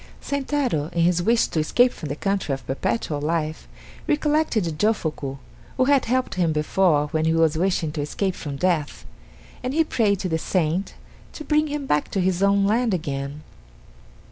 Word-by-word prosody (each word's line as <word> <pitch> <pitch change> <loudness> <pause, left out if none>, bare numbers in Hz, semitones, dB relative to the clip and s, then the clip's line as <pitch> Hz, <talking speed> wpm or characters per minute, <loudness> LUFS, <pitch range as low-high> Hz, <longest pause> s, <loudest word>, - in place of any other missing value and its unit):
Sentaro, 270 - -1
in 170 - +1
his 175 0 +3
wish 230 +5 +3
to 160 - -2
escape 245 +11 +3
from 150 - -7
the 140 - -2
country 195 -5 -1
of 135 - -12
Perpetual 150 - -2
Life, 155 0 -2 0.4
recollected 295 - +1
Jofuku, 155 -10 -1 0.4
who 255 - +3
had 280 -1 +3
helped 255 +2 0
him 175 -3 +1
before 150 -1 +2
when 155 +1 0
he 160 0 +2
was 165 -1 +3
wishing 170 -2 0
to 150 -1 -3
escape 185 +6 -1
from 145 -5 -6
death 160 -2 -1 0.6
and 255 +3 -3
he 325 - +4
prayed 215 -9 +1
to 185 - -2
the 160 -2 -1
saint 175 +2 -1 0.4
to 305 - -7
bring 305 0 +2
him 295 -1 -4
back 150 - 0
to 195 - -2
his 185 0 +1
own 200 0 +3
land 225 0 +2
again. 145 -2 -4
180 Hz, 175 wpm, -23 LUFS, 155-230 Hz, 0.6 s, he